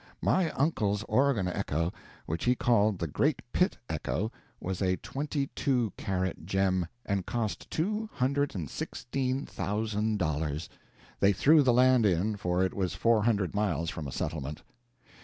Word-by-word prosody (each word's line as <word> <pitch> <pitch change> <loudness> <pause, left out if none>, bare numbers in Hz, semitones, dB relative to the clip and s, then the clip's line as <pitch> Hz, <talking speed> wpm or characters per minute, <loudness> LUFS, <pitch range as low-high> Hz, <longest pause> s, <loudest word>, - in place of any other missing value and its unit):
My 185 -3 +3
uncle's 110 -8 +1
Oregon 130 -6 +2
echo, 85 -1 -1 0.3
which 80 +2 -3
he 125 +1 +4
called 110 -5 +3
the 85 - -2
Great 75 - +1
Pitt - - +2
Echo, 105 +8 -2 0.3
was 95 +1 -4
a 95 -1 +2
twenty 140 0 -3
two 125 -6 +1
carat 95 -3 -2
gem, 95 -2 +1 0.2
and 100 -3 -1
cost 115 -3 -3
two 210 +6 -1
hundred 140 +2 0
and 85 -6 -3
sixteen 130 - -3
thousand 105 +1 -1
dollars 75 -3 -1 0.5
they 100 +1 +5
threw 150 - +6
the 130 -3 +4
land 125 -2 +5
in, 100 +4 +1
for 90 -2 0
it 95 - 0
was 95 -4 -1
four 115 -2 +3
hundred 100 -6 +1
miles 85 -6 0
from 80 -5 -5
a - - -6
settlement. 75 0 -4
105 Hz, 155 wpm, -29 LUFS, 90-125 Hz, 0.5 s, threw